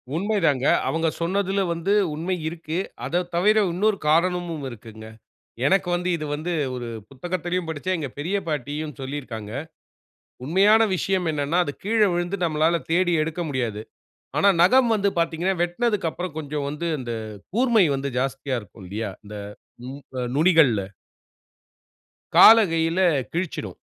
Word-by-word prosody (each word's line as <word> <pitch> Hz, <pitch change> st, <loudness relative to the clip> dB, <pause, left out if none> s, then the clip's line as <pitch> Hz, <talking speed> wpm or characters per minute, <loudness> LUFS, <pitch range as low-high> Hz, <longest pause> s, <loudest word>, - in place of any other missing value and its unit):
உண்மை 205 Hz, +5 st, 0 dB
தாங்க. 135 Hz, -3 st, +2 dB, 0.2 s
அவங்க 160 Hz, 0 st, 0 dB
சொன்னதுல 195 Hz, +3 st, 0 dB
வந்து 170 Hz, +4 st, -1 dB, 0.2 s
உண்மை 170 Hz, +5 st, -2 dB
இருக்கு. 160 Hz, 0 st, -4 dB, 0.3 s
அதத் 175 Hz, +6 st, -1 dB
தவிர 210 Hz, +5 st, +4 dB, 0.2 s
இன்னொரு 205 Hz, +3 st, +1 dB
காரணமும் 170 Hz, -1 st, +1 dB
இருக்குங்க. 110 Hz, -2 st, -11 dB, 0.6 s
எனக்கு 190 Hz, +3 st, +2 dB
வந்து 175 Hz, +1 st, -1 dB
இது 155 Hz, -2 st, -5 dB
வந்து 160 Hz, +4 st, -3 dB, 0.2 s
ஒரு 125 Hz, -1 st, -5 dB, 0.2 s
புத்தகத்திலயும் 175 Hz, +5 st, -3 dB
படிச்சேன். 165 Hz, +4 st, -2 dB
எங்க 145 Hz, -3 st, -3 dB
பெரிய 175 Hz, +7 st, -1 dB
பாட்டியும் 150 Hz, +1 st, -3 dB
சொல்லியிருக்காங்க. 130 Hz, -6 st, -6 dB, 0.9 s
உண்மையான 200 Hz, +9 st, +5 dB
விஷயம் 185 Hz, -1 st, 0 dB
என்னன்னா 150 Hz, +3 st, 0 dB
அது 145 Hz, -, -4 dB
கீழே 215 Hz, +1 st, +3 dB
விழுந்து 175 Hz, +3 st, -2 dB
நம்மளால 165 Hz, +1 st, +1 dB
தேடி 175 Hz, +1 st, +2 dB
எடுக்க 160 Hz, +3 st, -3 dB
முடியாது. 120 Hz, -6 st, -2 dB, 0.6 s
ஆனா 200 Hz, -, +5 dB
நகம் 240 Hz, +6 st, +5 dB
வந்து 200 Hz, -1 st, +1 dB
பாத்தீங்கன்னா 170 Hz, +3 st, 0 dB
வெட்னதுக்கப்புற 175 Hz, -2 st, -1 dB
கொஞ்சம் 145 Hz, -1 st, -4 dB
வந்து 150 Hz, +4 st, -4 dB
இந்த 120 Hz, -2 st, -4 dB, 0.4 s
கூர்மை 235 Hz, -3 st, +4 dB
வந்து 135 Hz, +1 st, -3 dB
ஜாஸ்தியா 135 Hz, 0 st, -2 dB
இருக்கும் 95 Hz, -1 st, -14 dB
இல்லையா. 105 Hz, +2 st, -4 dB
இந்த 105 Hz, +1 st, -9 dB, 0.5 s
நு 130 Hz, -, -6 dB, 0.4 s
நுனிகள்ல. 155 Hz, -, +4 dB, 1.5 s
கால 225 Hz, -, +10 dB
கையில 165 Hz, +2 st, 0 dB, 0.3 s
கிழிச்சிடும். 170 Hz, 0 st, -4 dB
165 Hz, 130 wpm, -24 LUFS, 145-185 Hz, 1.5 s, கால